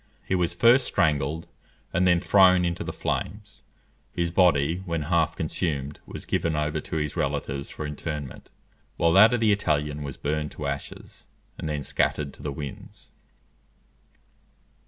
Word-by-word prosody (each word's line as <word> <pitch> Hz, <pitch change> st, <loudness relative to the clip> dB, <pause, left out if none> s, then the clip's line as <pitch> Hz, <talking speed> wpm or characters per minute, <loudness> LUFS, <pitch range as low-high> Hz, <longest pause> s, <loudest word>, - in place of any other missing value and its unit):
He -, -, -2 dB
was 90 Hz, -1 st, 0 dB
first 120 Hz, +7 st, +5 dB
strangled, 75 Hz, +1 st, 0 dB, 0.5 s
and 90 Hz, +1 st, +3 dB
then 90 Hz, -1 st, +4 dB
thrown 90 Hz, -1 st, +5 dB
into 85 Hz, -1 st, -2 dB
the -, -, -4 dB
flames: -, -, -4 dB, 0.5 s
his 85 Hz, -1 st, -1 dB
body, 85 Hz, -3 st, +3 dB
when 85 Hz, -2 st, -1 dB
half 80 Hz, 0 st, +1 dB
consumed, 75 Hz, -3 st, -3 dB
was -, -, -7 dB
given 80 Hz, -2 st, 0 dB
over 75 Hz, 0 st, -1 dB
to -, -, -6 dB
his 75 Hz, -2 st, -2 dB
relatives 70 Hz, 0 st, -2 dB
for 75 Hz, -, -6 dB
interment, 75 Hz, -2 st, -6 dB, 0.5 s
while 85 Hz, 0 st, +3 dB
that 105 Hz, +4 st, +8 dB
of -, -, -1 dB
the 110 Hz, -2 st, +4 dB
Italian 75 Hz, -7 st, 0 dB
was 70 Hz, -2 st, -6 dB
burned 75 Hz, +1 st, -2 dB
to 75 Hz, -, -6 dB
ashes, 70 Hz, 0 st, -7 dB, 0.3 s
and 80 Hz, -, -4 dB
then 75 Hz, -1 st, -2 dB
scattered 70 Hz, 0 st, 0 dB
to -, -, -15 dB
the 75 Hz, -, -3 dB
winds. 70 Hz, -1 st, -8 dB
75 Hz, 155 wpm, -26 LUFS, 75-85 Hz, 0.5 s, that